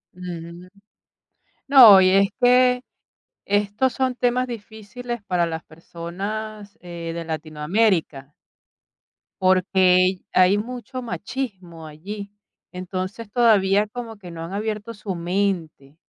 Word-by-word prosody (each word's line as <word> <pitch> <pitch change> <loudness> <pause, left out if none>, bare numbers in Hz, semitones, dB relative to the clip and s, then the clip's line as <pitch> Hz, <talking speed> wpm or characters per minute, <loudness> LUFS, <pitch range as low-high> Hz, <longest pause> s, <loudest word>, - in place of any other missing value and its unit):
Ujú. 175 0 -9 1.0
No, 240 -8 +9
y 185 - +5
es 195 +1 +4
que 250 0 +4 0.6
estos 205 +5 0
son 260 -1 -1
temas 250 +1 0
difíciles 230 +1 -8
para 180 -3 0
las 160 0 -5
personas, 200 +6 -7
eh, 170 -2 -7
de 170 0 -5
Latinoamérica. 155 -1 -1 1.1
Porque 185 0 +3
hay 185 +2 +4
mucho 250 +3 -6
machismo 190 -5 -6
allí. 200 +7 -8 0.4
Entonces, 185 +4 -6
todavía 210 -4 +3
como 225 -1 -8
que 180 -4 -11
no 165 -1 -7
han 170 +3 -7
abierto 215 +2 -4
su 205 -2 -6
mente 170 -5 -3
195 Hz, 110 wpm, -22 LUFS, 175-220 Hz, 1.1 s, No